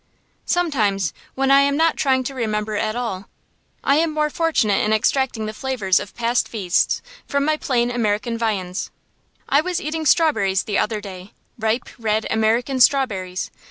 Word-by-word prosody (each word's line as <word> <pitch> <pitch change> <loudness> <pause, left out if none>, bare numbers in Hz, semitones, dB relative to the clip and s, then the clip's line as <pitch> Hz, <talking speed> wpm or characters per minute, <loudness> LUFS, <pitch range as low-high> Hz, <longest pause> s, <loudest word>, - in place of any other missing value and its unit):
Sometimes, 215 - +1 0.2
when 270 0 +1
I 275 0 +7
am 280 0 +2
not 325 0 +3
trying 260 -2 +1
to 275 - -5
remember 215 -4 -2
at 215 +1 -1
all, 225 -6 -4 0.5
I 280 - +3
am 325 0 +2
more 305 0 0
fortunate 280 -13 +1
in 215 - 0
extracting 220 +1 +1
the 215 - -4
flavors 215 -7 0
of 200 - -9
past 240 +1 +1
feasts 190 -6 0 0.2
from 280 0 0
my 310 0 +2
plain 245 -5 0
American 230 -1 -1
viands. 200 -5 -2 0.6
I 280 - +4
was 360 +1 -2
eating 310 +1 -3
strawberries 225 - +3
the 205 - -1
other 215 -1 -1
day, 190 -1 -10 0.3
ripe, 225 +2 0
red 220 -1 0
American 230 +4 +1
strawberries. 200 -10 +2
235 Hz, 160 wpm, -21 LUFS, 210-275 Hz, 0.6 s, I